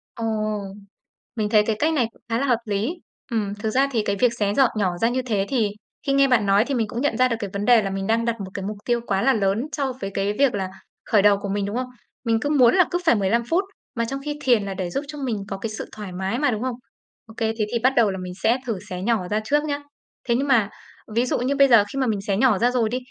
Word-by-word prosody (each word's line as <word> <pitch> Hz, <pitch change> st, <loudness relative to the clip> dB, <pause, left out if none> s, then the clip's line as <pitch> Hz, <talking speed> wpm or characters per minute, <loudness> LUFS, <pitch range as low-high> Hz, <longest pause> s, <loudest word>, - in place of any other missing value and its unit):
Ồ! 230 Hz, -, -4 dB, 1.1 s
Mình 210 Hz, -2 st, -1 dB
thấy 210 Hz, -1 st, +5 dB
cái 220 Hz, -, 0 dB
cách 320 Hz, +2 st, +2 dB
này 250 Hz, -7 st, +2 dB
cũng -, -, -26 dB
khá 230 Hz, -, +1 dB
là 280 Hz, -, 0 dB
hợp 240 Hz, -3 st, +3 dB
lý. 210 Hz, -, -1 dB, 0.4 s
Ừm, 205 Hz, -3 st, -1 dB
thực 210 Hz, +1 st, -3 dB
ra 265 Hz, +5 st, +2 dB
thì 225 Hz, -3 st, +1 dB
cái 200 Hz, -, 0 dB
việc 240 Hz, +3 st, +2 dB
xé 205 Hz, -1 st, 0 dB
giọt 265 Hz, -1 st, +4 dB
nhỏ 185 Hz, -4 st, 0 dB
ra 230 Hz, -, +4 dB
như 255 Hz, +1 st, -1 dB
thế 210 Hz, -6 st, -1 dB
thì 230 Hz, -6 st, +1 dB, 0.4 s
khi 275 Hz, -, +2 dB
nghe 275 Hz, 0 st, +5 dB
bạn 235 Hz, -5 st, +3 dB
nói 200 Hz, +3 st, +4 dB
thì 280 Hz, -, -3 dB
mình 225 Hz, -4 st, 0 dB
cũng 235 Hz, +3 st, -4 dB
nhận 290 Hz, -, 0 dB
ra 255 Hz, 0 st, +4 dB
được 230 Hz, -, -1 dB
cái 200 Hz, -3 st, -4 dB
vấn 200 Hz, +1 st, -2 dB
đề 240 Hz, -3 st, +6 dB
là 195 Hz, -, -2 dB
mình 195 Hz, 0 st, -3 dB
đang 230 Hz, +1 st, +1 dB
đặt 235 Hz, -1 st, 0 dB
một 190 Hz, -1 st, -6 dB
cái 195 Hz, -1 st, -5 dB
mục 210 Hz, 0 st, -4 dB
tiêu 240 Hz, -1 st, +1 dB
quá 195 Hz, -1 st, +1 dB
là 270 Hz, -, +4 dB
lớn 210 Hz, +4 st, 0 dB
so 275 Hz, -3 st, -1 dB
với 195 Hz, -, -3 dB
cái 200 Hz, +1 st, 0 dB
việc 275 Hz, -5 st, +4 dB
là 190 Hz, -1 st, -2 dB, 0.4 s
khởi 210 Hz, -4 st, +3 dB
đầu 205 Hz, -1 st, +5 dB
của 200 Hz, -, -4 dB
mình, 200 Hz, 0 st, -1 dB
đúng 205 Hz, -, -4 dB
không? 255 Hz, +1 st, -2 dB, 0.4 s
Mình 225 Hz, -1 st, +1 dB
cứ 290 Hz, -, -1 dB
muốn 255 Hz, -6 st, +5 dB
là 365 Hz, -3 st, +6 dB
cứ 350 Hz, -, 0 dB
phải 240 Hz, -, +5 dB
15 210 Hz, +4 st, +1 dB
phút, 360 Hz, +4 st, +2 dB, 0.3 s
mà 230 Hz, 0 st, 0 dB
trong 275 Hz, +4 st, -4 dB
khi 295 Hz, 0 st, -4 dB
thiền 240 Hz, -6 st, +3 dB
là 195 Hz, -, -4 dB
để 185 Hz, -2 st, -3 dB
giúp 275 Hz, -, -3 dB
cho 295 Hz, 0 st, -8 dB
mình 250 Hz, -6 st, -2 dB
có 195 Hz, -1 st, -4 dB
cái 220 Hz, +3 st, -4 dB
sự 215 Hz, -, -6 dB
thoải 210 Hz, -3 st, -8 dB
mái 190 Hz, +6 st, -2 dB
mà, 290 Hz, -3 st, +2 dB
đúng 215 Hz, -, -3 dB
không? 255 Hz, -2 st, -2 dB, 0.5 s
Ô 220 Hz, -, -14 dB
kê, 225 Hz, -1 st, 0 dB
thế 210 Hz, -, +2 dB
thì 235 Hz, -, 0 dB
bắt 260 Hz, +3 st, +3 dB
đầu 220 Hz, -4 st, +4 dB
là 190 Hz, -, -5 dB
mình 180 Hz, -1 st, -6 dB
sẽ 235 Hz, +3 st, +4 dB
thử 225 Hz, -5 st, -1 dB
xé 180 Hz, -1 st, -5 dB
nhỏ 210 Hz, -4 st, 0 dB
ra 210 Hz, +2 st, 0 dB
trước 295 Hz, +5 st, +1 dB
nhá. 290 Hz, -1 st, -2 dB, 0.5 s
Thế 235 Hz, -, +2 dB
nhưng 275 Hz, +3 st, 0 dB
mà 230 Hz, -7 st, +3 dB, 0.5 s
ví 240 Hz, -, +3 dB
dụ -, -, 0 dB
như 260 Hz, +3 st, 0 dB
bây 275 Hz, 0 st, +6 dB
giờ 230 Hz, -5 st, +6 dB
khi 275 Hz, -, -2 dB
mà 260 Hz, -, +1 dB
mình 205 Hz, -3 st, -1 dB
xé 200 Hz, -2 st, -1 dB
nhỏ 235 Hz, -4 st, +4 dB
ra 245 Hz, +4 st, +2 dB
rồi 235 Hz, -3 st, +1 dB
đi, 245 Hz, -, -1 dB
230 Hz, 300 wpm, -23 LUFS, 205-255 Hz, 1.1 s, đề